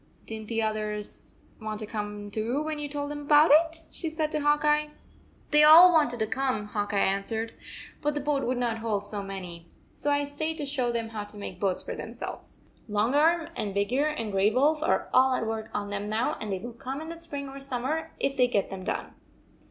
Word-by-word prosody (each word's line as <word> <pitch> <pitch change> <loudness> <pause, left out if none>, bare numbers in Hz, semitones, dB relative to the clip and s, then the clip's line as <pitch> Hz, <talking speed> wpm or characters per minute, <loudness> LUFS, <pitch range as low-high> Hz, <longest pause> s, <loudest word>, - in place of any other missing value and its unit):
Did 225 - -5
n 215 - -11
t 230 - -4
the 225 - +2
others 215 -1 -3 0.3
want 215 0 -4
to - - -3
come 205 -1 -5
too 235 +8 -1
when 310 -1 -3
you 295 -1 -3
told 285 0 -3
them 295 0 -5
about 295 +2 +5
it?" 325 +1 +3
she 325 - -3
said 315 -1 -2
to 305 - 0
Hawk 295 +1 +2
Eye. 300 0 +3 0.6
"They 300 0 +6
all 330 +4 +10
wanted 290 -7 +3
to - - +3
come," 255 -2 -1
Hawk 205 0 -3
Eye 205 - 0
answered, 200 +4 0 0.5
"but 295 0 0
the - - 0
boat 290 -1 0
would 250 +1 0
not 235 -2 -1
hold 215 -3 -1
so 205 0 -5
many. 180 -4 -7 0.3
So 290 - -2
I 285 0 +2
stayed 315 +3 -2
to 295 - -3
show 265 -4 -1
them 230 -1 -2
how 215 -2 -5
to 205 - -10
make 190 -3 -7
boats 190 -2 0
for - - -5
themselves. - - -7 0.3
Long 210 +4 +1
Arm 330 +3 +3
and 200 -2 -3
Big 200 +4 0
Ear 285 +4 +3
and 230 -9 -3
Gray 195 +1 +3
Wolf 290 +7 +2
are - - +1
all 260 0 +5
at 230 - -1
work 220 0 -3
on 205 0 -3
them 205 +1 -3
now, 230 +8 0
and 215 - -3
they 190 - 0
will 235 +5 -7
come 260 +4 -5
in 320 +1 -7
the 335 - -5
spring 295 -4 -6
or 270 +1 -8
summer 275 +5 -2
if 275 - +1
they 250 -2 +4
get 205 -5 0
them 190 -1 -6
done." - - -3
245 Hz, 235 wpm, -27 LUFS, 210-295 Hz, 0.6 s, all